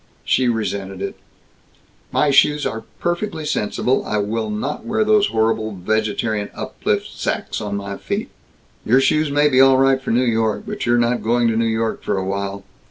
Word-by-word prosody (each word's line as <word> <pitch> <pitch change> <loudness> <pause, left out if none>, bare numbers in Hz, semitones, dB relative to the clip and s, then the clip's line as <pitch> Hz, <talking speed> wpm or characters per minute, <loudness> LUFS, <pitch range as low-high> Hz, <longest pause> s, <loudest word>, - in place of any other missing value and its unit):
She 130 - +2
resented 100 -4 -2
it: - - -4 1.0
"My 150 - +2
shoes 150 +2 +4
are 110 - -4
perfectly 175 -1 -2
sensible! 125 +1 0
I 105 - -2
will 110 +2 -1
not 110 +8 -3
wear 220 -1 0
those 210 -1 +4
horrible 110 -1 0
vegetarian 110 +2 -1
uplift - - -3
sacks - - -3
on 105 -1 -3
my 100 0 -5
feet!" - - -4 0.5
"Your 125 +4 +4
shoes 155 +3 +2
may 145 +1 +3
be 130 -2 +4
all 135 0 +6
right 135 0 +3
for - - -6
New 125 +2 +2
York, 110 -2 0
but 210 -9 -4
you're 120 0 +4
not 120 -1 +1
going 120 +2 +2
to 115 - 0
New 115 +1 +1
York 110 0 -1
for - - -1
a 95 - -2
while. 100 0 -3
115 Hz, 180 wpm, -20 LUFS, 105-135 Hz, 1.0 s, all